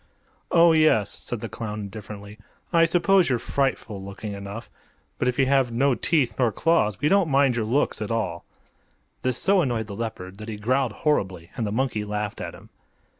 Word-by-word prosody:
"Oh, 170 0 +6
yes;" 155 -11 +4
said - - -6
the - - -4
clown, 105 -2 -5
indifferently. 105 +1 -9 0.3
"I 165 -1 +6
suppose 180 +1 +3
you're 125 - +2
frightful 120 -6 -2
looking 100 +2 -7
enough. 100 +3 -7 0.5
But 125 - +1
if 125 - 0
you 135 - +4
have 135 -2 +2
no 135 +4 +2
teeth 130 +1 0
nor 120 -3 +3
claws 105 - +1
we 145 - +1
don't 195 -1 +3
mind 135 -2 +3
your 115 -2 -1
looks 125 0 0
at 105 - -3
all." 110 -7 -2 0.8
This 130 -2 0
so 195 -1 +3
annoyed 120 -7 -1
the 100 -1 -8
leopard 100 -4 -6
that 110 +1 -7
he 110 - -5
growled 125 +3 +1
horribly, 95 - 0
and 115 -4 -2
the - - -3
monkey 115 -2 -1
laughed 105 0 -4
at - - -6
him. - - -15
115 Hz, 190 wpm, -25 LUFS, 105-140 Hz, 0.8 s, Oh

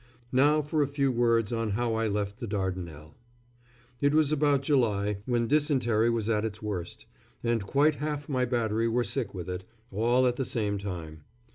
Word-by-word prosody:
Now 145 +4 +4
for 150 +1 0
a 145 - +2
few 140 -1 0
words 115 -2 +2
on 115 -1 -1
how 120 -1 0
I 110 0 0
left 100 +1 -2
the 120 - -4
Dardanelles. 90 -7 -4 0.9
It 145 +1 +3
was 155 -2 +3
about 145 -2 +2
July, 105 -8 +1
when 120 -2 +1
dysentery 130 -6 +2
was 115 -2 -1
at 110 -2 +1
its 110 -1 -4
worst, 105 0 -5 0.4
and 115 -3 +1
quite 145 +3 +3
half 150 -1 -3
my 130 -3 0
battery 115 -2 0
were 120 +2 +1
sick 115 -1 -3
with 90 -1 -6
it, 90 0 -4 0.3
all 120 +5 +2
at 125 -1 +1
the 135 - 0
same 105 -5 -1
time. 85 -6 -6
115 Hz, 180 wpm, -28 LUFS, 105-135 Hz, 0.9 s, Now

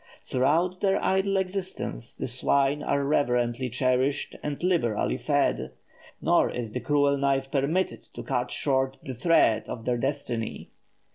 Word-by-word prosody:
Throughout 165 +8 +1
their 195 -1 +2
idle 190 +1 +2
existence, 190 - -4
the - - -4
swine 140 +1 +1
are 140 -1 0
reverentially 125 -3 +1
cherished 130 +3 0
and 150 +2 -4
liberally 165 - +1
fed; 65 0 0 0.5
nor - - +3
is 115 -3 -4
the 125 - -3
cruel 145 0 +2
knife 135 -1 0
permitted 150 +7 0
to - - -6
cut - - -1
short 135 -1 0
the 130 - -5
thread 125 -4 +3
of 115 -2 -6
their 125 -1 +1
destiny. 130 -4 -3
140 Hz, 140 wpm, -27 LUFS, 125-160 Hz, 0.5 s, nor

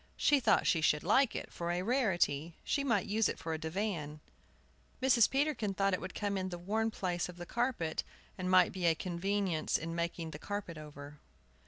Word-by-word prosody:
She 290 - +4
thought 255 - +3
she 165 - +3
should 150 -1 +2
like 265 -3 +3
it, - - -6
for 170 0 -4
a 175 +1 0
rarity. 175 - +1
She 280 - 0
might 230 -9 +1
use 215 0 +2
it - - -4
for 160 - -4
a 160 - -3
divan. 160 -3 -3 0.8
Mrs. 250 -4 +5
Peterkin 270 -8 0
thought 195 0 +2
it 185 - 0
would 185 +1 -7
come 200 -2 -1
in 185 0 -3
the 175 - -5
worn 215 +6 0
place 180 -5 -2
of 175 - -10
the 175 - -7
carpet, 235 -8 -1 0.3
and 185 -1 -3
might 185 -1 +6
be 180 -2 -1
a 165 - +4
convenience 185 -1 -1
in 165 +1 -5
making 170 -1 -3
the 150 - -8
carpet 195 -4 -5
over. 145 -1 -10
185 Hz, 200 wpm, -33 LUFS, 165-210 Hz, 0.8 s, might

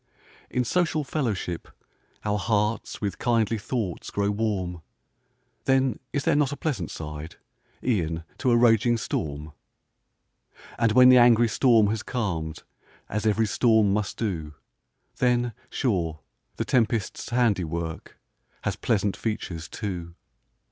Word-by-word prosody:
In 125 - 0
social 160 +2 +1
fellowship, 110 - -2 0.6
our 105 0 +1
hearts 105 +1 -1
With 100 -3 -3
kindly 115 -2 +1
thoughts 105 -5 -3
grow 100 0 0
warm; 100 -5 -2 0.8
Then 135 -3 +2
is 140 - -1
there - - +3
not 145 -2 +2
a 145 - -4
pleasant 125 - -2
side, 75 0 -7 0.5
E'en 85 -9 0 0.2
to 130 - +1
a 120 - +5
raging 120 0 +4
storm? 75 -7 -4 1.3
And 115 -2 +3
when 125 +1 +8
the 130 -1 +8
angry 120 -1 +6
storm 115 -1 +4
has 110 -1 -2
calm'd, 85 -10 -3 0.5
As 105 +1 -1
ev'ry 110 +1 +3
storm 110 -1 +3
must 105 -1 -2
do, 80 -9 -3 0.6
Then, 120 -1 +2 0.2
sure, 85 - -1 0.3
the - - -2
tempest's 115 -3 0
handiwork, 90 -9 -1 0.5
Has - - -1
pleasant 105 -3 0
features, 85 -8 -4
too. 90 -5 -5
110 Hz, 125 wpm, -26 LUFS, 90-120 Hz, 1.3 s, when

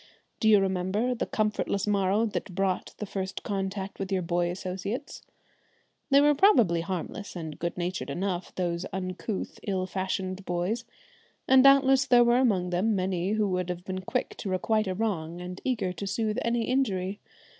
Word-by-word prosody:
Do 220 - +3
you 210 -2 +7
remember 195 +5 0
the 240 - -3
comfortless 210 -2 0
morrow 200 +1 +2
that 200 -4 -4
brought 195 -1 -1
the 210 - -4
first 190 -1 -4
contact 195 -1 -3
with 195 0 -4
your 185 -2 +1
boy 175 0 0
associates? 190 +8 -5 0.9
They 275 0 +6
were 295 +1 +5
probably 240 - +4
harmless 190 +4 -5
and 160 -3 -6
good 170 +1 -3
natured 180 +1 -3
enough, 185 -1 -2
those 175 -1 -2
uncouth, 185 +2 -4
ill 190 -2 -1
fashioned 190 0 -3
boys, 185 +7 -2 0.6
and 260 0 +7
doubtless 275 0 +6
there 245 -2 +6
were 240 0 +4
among 190 -8 +2
them 200 +5 +1
many 185 0 0
who 215 -1 +1
would 180 -1 -1
have 180 0 -5
been 185 0 -4
quick 185 - -2
to 200 - -5
requite 215 +3 +1
a 185 - -2
wrong 175 -6 -2
and 180 +1 -7
eager 210 -8 -1
to 200 - -5
soothe 215 +1 -1
any 235 0 0
injury. 205 -6 0
195 Hz, 170 wpm, -28 LUFS, 180-220 Hz, 0.9 s, you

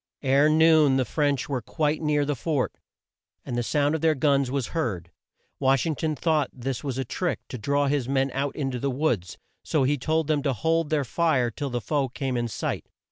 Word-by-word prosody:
Ere 140 +2 +4
noon 155 -3 +5
the 130 - +1
French 145 -2 0
were 135 -3 -2
quite 150 +6 -1
near 150 -2 +1
the 145 0 -1
fort 140 0 -1 0.7
and 120 - -4
the 120 - 0
sound 145 +4 +1
of 160 - -1
their 160 -1 +3
guns 140 -1 +2
was 135 -2 -2
heard. 95 - -2 0.5
Wash 135 -1 +3
ing 165 - 0
ton 155 +1 -2
thought 155 -1 +1
this 130 0 -4
was 135 -3 -3
a 135 - -2
trick 175 +8 -2
to 125 - -5
draw 140 +6 +1
his 140 -3 0
men 135 0 +1
out 135 +1 -2
in 135 -3 -2
to 125 - -4
the 140 - -1
woods, 125 - -1 0.3
so 150 - +1
he 140 +2 +1
told 160 +4 0
them 150 -1 +1
to 140 -2 0
hold 160 +6 0
their 150 -3 +1
fire 135 -4 +1
till 145 +1 -4
the 120 -1 -2
foe 140 +3 0
came 130 0 -3
in 120 -1 0
sight. 115 - -4
140 Hz, 220 wpm, -25 LUFS, 130-155 Hz, 0.7 s, noon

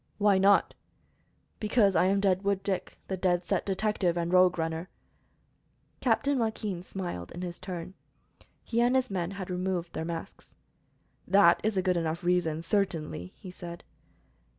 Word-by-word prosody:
"Why 200 -2 +4
not?" 200 +1 +4 0.9
"Because 210 -3 +3
I - - +4
am 195 +1 +3
Deadwood 195 0 +1
Dick, 190 -2 -3
the 190 - -3
Dead 180 -1 +1
Set - - -1
Detective 195 -3 0
and 170 +1 -1
Rogue 180 -1 +5
Runner." 165 +2 -3 1.1
Captain 275 +3 +1
Joaquin 215 -5 -2
smiled 175 - -6
in 175 - -6
his 175 -1 -6
turn. 185 -1 -6 0.7
He 235 0 0
and 245 +2 +3
his 260 -3 +1
men 175 -3 -1
had 195 -1 -6
now - - -2
removed 180 -2 -2
their 160 - -3
masks. 165 0 -7 0.7
"That 180 -2 +6
is 215 -2 0
a 185 - +2
good 180 -1 +2
enough 165 +1 -2
reason, 175 -3 +1
certainly," 165 - -2
he 185 - -10
said. 175 -1 -9
185 Hz, 155 wpm, -29 LUFS, 170-200 Hz, 1.1 s, That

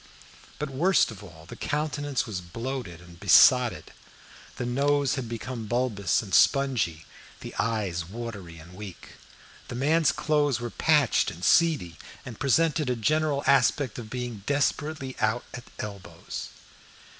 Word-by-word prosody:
But, 150 -1 -4
worst 170 +2 +3
of 105 -3 -11
all, 80 -4 -13
the - - -9
countenance 145 -3 -2
was 100 -5 -5
bloated 115 -1 -6
and 85 -1 -15
besotted. 125 - +5 0.6
The 125 - -4
nose 140 +3 +1
had 130 -5 -4
become 115 0 -5
bulbous 110 - 0
and - - -10
spongy, 115 - +2 0.4
the - - -8
eyes 100 -7 -1
watery 100 -6 -7
and 85 +3 -13
weak. 95 -2 -10 0.6
The - - -6
man's 155 +5 +3
clothes 145 -4 +1
were 120 -1 -5
patched 150 -6 +2
and 85 +2 -6
seedy, 150 - +3 0.3
and 120 -4 -9
presented 150 +1 +2
a 125 - +1
general 150 +4 +1
aspect 135 -2 +2
of 110 -2 -8
being 120 -3 -5
desperately 145 -1 -1
out 110 +3 +1
at 120 -1 -8
elbows. 100 -3 -7
125 Hz, 140 wpm, -27 LUFS, 105-145 Hz, 0.6 s, besotted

